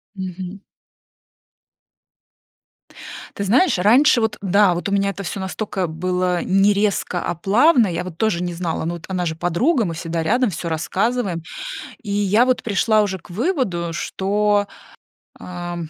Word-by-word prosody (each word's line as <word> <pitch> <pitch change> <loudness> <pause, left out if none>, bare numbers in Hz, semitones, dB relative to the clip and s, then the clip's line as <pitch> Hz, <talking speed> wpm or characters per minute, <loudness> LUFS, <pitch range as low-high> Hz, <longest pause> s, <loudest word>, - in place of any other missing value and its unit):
Мгм. 185 0 -6 2.8
Ты 200 - -2
знаешь, 245 - +3
раньше 240 +8 +5
вот, 220 -2 0
э, - - -21
да, 195 -1 +4
вот 175 - -3
у 200 - -2
меня 200 0 +2
это 200 - -6
всё 195 +1 -5
настолько 190 0 -3
было 180 +2 -1
не 195 +2 +3
резко, 200 -3 0
а - - -1
плавно, 230 - +4
я 175 0 -3
вот 170 -3 -9
тоже 185 -6 +1
не 175 -1 -3
знала, 165 -2 -3
но 170 +2 -2
вот 170 - -10
она 185 -2 -2
же 160 -1 -2
подруга, 225 - +1
мы 170 -3 -3
всегда 165 0 -3
рядом, 240 +7 +2
всё 170 -1 -5
рассказываем. 185 +2 -1 0.6
И 205 - -5
я 205 +3 +3
вот 255 -1 +1
пришла 215 0 +2
уже 190 -2 -3
к 170 - -19
выводу, 205 - -1
что, 205 +3 0 0.7
ам, 175 -2 -6
190 Hz, 160 wpm, -20 LUFS, 175-210 Hz, 2.8 s, раньше